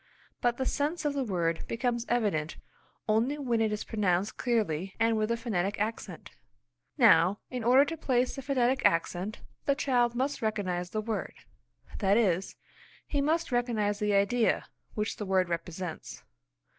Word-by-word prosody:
But 240 0 +1
the 260 - -1
sense 300 +5 -1
of 290 - +1
the 280 -1 -1
word 170 -7 -1
becomes 235 0 -1
evident 200 -10 0 0.5
only 230 +7 +2
when 240 -6 0
it 220 -1 +1
is 210 - -2
pronounced 195 -2 0
clearly 195 -7 -1
and 225 0 +3
with 215 0 0
the 235 - +1
phonetic 205 -4 -2
accent. 210 -5 -4 0.7
Now, 170 +5 +5
in 250 -2 -3
order 255 +4 +6
to 330 +2 -5
place 255 -4 0
the 270 - -5
phonetic 265 -1 +1
accent 175 +5 0 0.2
the 280 - +3
child 245 -4 +1
must 265 +4 -1
recognise 185 -5 -2
the 215 +3 -2
word; 220 0 -4 0.6
that 200 -1 +3
is, 190 -5 +1 0.5
he 285 - -1
must 320 +2 0
recognise 220 -4 0
the 210 -1 +1
idea 220 +4 +2 0.3
which 210 0 -2
the 210 - -4
word 185 -2 +2
represents. 170 0 -5
220 Hz, 155 wpm, -29 LUFS, 195-245 Hz, 0.7 s, order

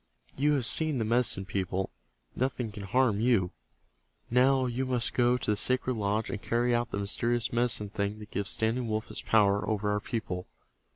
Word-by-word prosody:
You 145 +3 +2
have 135 -5 +1
seen 155 +3 +3
the 115 - -1
Medicine 115 -4 +2
People. 95 -1 -2 0.4
Nothing 125 -3 -2
can 105 - -8
harm 115 0 +2
you. 110 -6 +2 0.8
Now 130 +2 +4
you 125 +1 -2
must 125 -2 0
go 120 0 +3
to 110 - 0
the - - +2
sacred 130 +3 +1
lodge, 105 +2 -1
and 110 -4 -5
carry 120 +1 +1
out 120 0 0
the - - -4
mysterious 120 +5 -1
Medicine 120 -3 +1
Thing 100 0 -2
that 105 -1 -11
gives 100 -1 -3
Standing 115 +2 0
Wolf 110 0 -2
his - - -6
power 100 -3 +3
over 105 -1 0
our 105 - 0
people. 100 -5 -4
115 Hz, 185 wpm, -29 LUFS, 105-125 Hz, 0.8 s, Now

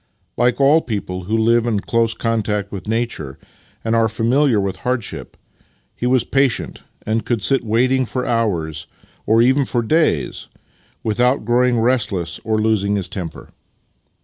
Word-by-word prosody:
Like 120 +1 +1
all 145 +4 +5
people 95 - -4
who 110 +4 0
live 115 +1 +3
in 110 -3 +1
close 115 +1 0
contact 105 -3 -1
with 100 -1 -7
nature 110 - -3 0.5
and 115 0 0
are 115 -1 +3
familiar 115 +2 +2
with 95 -1 -2
hardship, 125 +2 -4 0.6
he 125 - -2
was 125 -1 +3
patient, 135 -2 0 0.2
and 110 +1 0
could 115 -5 -2
sit 130 +9 +2
waiting 125 +3 +1
for 125 +1 -3
hours, 85 -10 -1 0.4
or 115 +2 +4
even 130 +3 +3
for 120 -2 -1
days, 160 +8 0 0.5
without 120 +3 +1
growing 120 +1 +2
restless 105 -9 0
or 110 0 0
losing 105 -2 +1
his 95 -3 -1
temper. 90 -3 -7
115 Hz, 150 wpm, -19 LUFS, 105-125 Hz, 0.6 s, all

